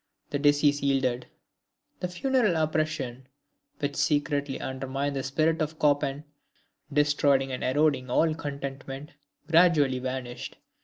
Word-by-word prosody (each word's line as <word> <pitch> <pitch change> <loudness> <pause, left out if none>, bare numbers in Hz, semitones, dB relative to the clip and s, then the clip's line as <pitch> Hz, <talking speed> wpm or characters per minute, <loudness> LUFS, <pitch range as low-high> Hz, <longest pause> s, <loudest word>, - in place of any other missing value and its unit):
The 145 - -1
disease 145 0 +3
yielded: 130 -3 0 0.7
"the 180 - -2
funereal 215 +1 +1
oppression 155 -5 -1 0.5
which 145 0 -3
secretly 145 -1 0
undermined 135 +2 -3
the 135 - -1
spirit 155 +5 0
of 155 +1 -2
Chopin, 145 -1 +1 0.7
destroying 145 -2 +2
and 130 - -4
corroding 140 -1 +1
all 155 +5 +3
contentment, 140 -2 -6 0.4
gradually 160 -6 +4
vanished. 130 -1 -5
145 Hz, 110 wpm, -27 LUFS, 135-155 Hz, 0.7 s, gradually